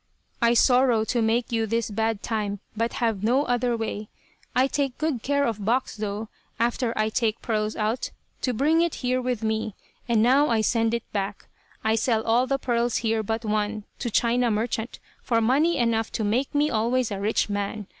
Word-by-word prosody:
I 235 0 +4
sorrow 245 -2 +4
to 240 +1 0
make 230 +2 +1
you 225 -1 0
this 230 0 -1
bad 220 0 -1
time, 210 -3 -2 0.2
but 230 +2 -1
have 225 -4 -1
no 250 +6 +3
other 245 -1 +1
way. 215 -1 -4 0.5
I 255 - +5
take 275 -2 -1
good 305 -6 -1
care 280 +2 +1
of 215 -3 -2
box, 245 +5 0
though, 210 0 -4 0.3
after 235 +1 +1
I 215 0 +2
take 220 -1 -1
pearls 215 -1 -1
out, 220 +3 -1 0.3
to 255 - +1
bring 300 +8 +2
it 340 -1 0
here 255 +1 +1
with 250 -3 -2
me, 220 -1 -1 0.3
and 225 -2 +4
now 275 +5 +4
I 225 -2 +2
send 225 +1 +1
it 235 - -3
back. 200 0 -3 0.4
I 220 - +2
sell 225 0 +1
all 235 +3 +2
the 275 +1 +1
pearls 240 -2 0
here 225 0 +2
but 225 +2 -3
one, 215 0 -1 0.2
to 240 - -2
China 240 +2 +2
merchant, 225 +2 -2 0.2
for 230 -2 +1
money 275 +9 +3
enough 230 -2 +1
to 220 - -1
make 245 +8 0
me 295 +1 +3
always 235 +2 +1
a 200 - -3
rich 210 +3 +1
man. 205 +1 -3
230 Hz, 195 wpm, -25 LUFS, 220-250 Hz, 0.5 s, I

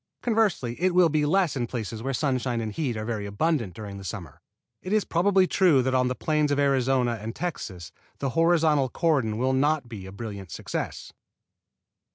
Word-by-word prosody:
Conversely 205 - 0
it 185 -1 +2
will 180 -2 +6
be 150 -1 +1
less 180 -1 +2
in 120 -3 -1
places 110 -2 -5
where 135 +3 -2
sunshine 130 -3 0
and 110 -1 -3
heat 125 -2 -2
are 110 - -4
very 110 -3 -3
abundant 110 - -1
during 100 -2 -7
the - - -9
summer. 95 -6 -7 0.4
It 185 - -4
is 215 -1 +2
probably 190 +2 +3
true 175 -8 +4
that 130 +1 0
on 130 -1 +3
the 125 - -1
plains 150 0 +1
of 145 - +1
Arizona 130 -4 +2
and 115 +2 -5
Texas 95 - -5 0.3
the 135 - -2
horizontal 160 -4 +3
cordon 135 -9 +1
will 130 +3 +1
not 145 0 +1
be 105 -5 -8
a - - -9
brilliant 100 -3 -7
success. - - -5
130 Hz, 190 wpm, -26 LUFS, 110-160 Hz, 0.4 s, will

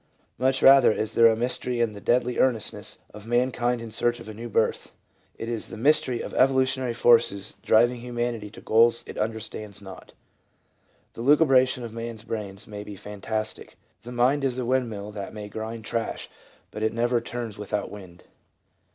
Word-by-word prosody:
Much 130 +1 +1
rather 135 -3 +8
is 110 0 -2
there 115 - +7
a 110 - +4
mystery 125 +1 -2
in 115 -2 +1
the 100 - -10
deadly 125 0 +1
earn 130 -2 +4
estness 110 - -5 0.2
of 105 +1 -11
mankind 120 0 +1
in 115 -1 -8
search 120 +2 0
of 115 - -11
a 110 - -7
new 115 +3 -7
birth: - - 0 0.4
it 115 - -6
is 115 -2 -3
the - - -8
mystery 130 -1 +2
of - - -7
evolutionary 130 -1 +2
forces 115 -5 +3
driving 120 +5 +3
humanity 120 -3 -3
to 105 - -13
goals 115 +1 +4
it - - -9
understands 110 -2 -4
not. 95 -2 -12 1.0
The - - -8
lucubration 130 -2 +4
of 115 -2 -7
man's 115 -1 -6
brains 105 -2 -5
may 105 -1 -8
be 105 -1 -9
fantastic 105 +2 -4
— 95 - -43
the 120 +4 -9
mind 125 +4 +2
is 130 -2 0
a 125 - -2
wind 130 -1 +1
mill 105 -1 -7
that 105 0 -7
may 105 -1 -6
grind 110 +1 -6
trash, 115 -1 -3 0.4
but 105 - -7
it 110 - 0
never 120 +1 +1
turns 115 -3 -6
without 105 0 -3
wind. 95 -4 -12
115 Hz, 185 wpm, -25 LUFS, 105-125 Hz, 1.0 s, rather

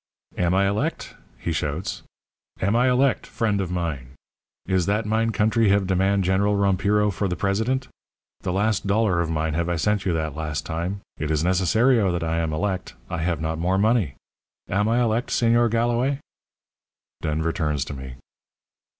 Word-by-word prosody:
"'Am 90 0 +1
I 100 0 +3
elect?' 100 +2 -2 0.2
he 85 - -3
shouts. 80 +3 -3 0.6
'Am 100 +4 +1
I 125 +2 +4
elect, 130 +1 +2
friend 105 -3 0
of 95 - -3
mine? 75 -8 -4 0.5
Is 95 -2 +1
that 105 +2 +1
mine 110 +1 +1
country 110 +1 +2
have 100 0 +3
demand 95 +1 +2
General 100 +3 +2
Rompiro 100 +1 +2
for 100 - -1
the 90 - -2
president? 110 +8 0 0.5
The - - -3
last 105 +1 0
dollar 100 -4 +2
of 85 - -2
mine 80 -1 -1
have 85 +2 -1
I 85 - +1
sent 105 +4 +1
you 90 - +2
that 80 -3 -2
last 75 -2 -3
time. 85 +5 -3 0.2
It 75 - -2
is 80 -1 +1
necessario 95 +5 +3
that 85 -1 -2
I 80 0 0
am 80 -1 -1
elect. 95 +3 -2 0.2
I - - -2
have 85 -1 -1
not 80 0 -2
more 90 +3 +1
money. 105 - +2 0.5
Am 105 +3 +1
I 120 +2 +2
elect, 115 +1 0
Señor 120 0 +3
Galloway?' 120 +4 +1 1.0
"Denver 80 +1 -1
turns 75 -5 -1
to 75 - -6
me. 65 -2 -8
95 Hz, 175 wpm, -24 LUFS, 80-110 Hz, 1.0 s, I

